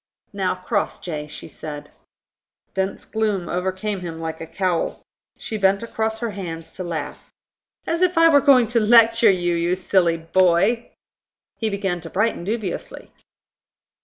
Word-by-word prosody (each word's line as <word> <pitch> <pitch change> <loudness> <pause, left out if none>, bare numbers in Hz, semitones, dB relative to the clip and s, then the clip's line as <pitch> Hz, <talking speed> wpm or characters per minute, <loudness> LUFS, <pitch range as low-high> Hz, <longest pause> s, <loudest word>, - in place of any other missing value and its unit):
"Now, 195 -2 0
Crossjay," 180 -5 -3
she 150 - -9
said. 150 -1 -8 0.8
Dense 190 0 -2
gloom 210 -5 -1
overcame 190 +3 -2
him 170 -2 -6
like 160 0 -5
a 165 - -6
cowl. 180 -1 -2 0.3
She 220 - -5
bent 195 +2 +3
across 220 -1 -2
her 230 0 -3
hands 165 -4 -7
to 185 - -6
laugh. 165 -4 -5 0.6
"As 335 +1 -1
if 365 -1 +2
I 330 0 +7
were 290 -3 +6
going 265 -4 +6
to 235 - +4
lecture 230 +1 +6
you, 175 -2 +1
you 170 +1 +1
silly 180 -2 +2
boy!" 185 +7 +2 0.7
He 225 - 0
began 195 -4 -2
to 165 - -8
brighten 210 -1 0
dubiously. 205 -2 -5
190 Hz, 145 wpm, -22 LUFS, 170-220 Hz, 0.8 s, I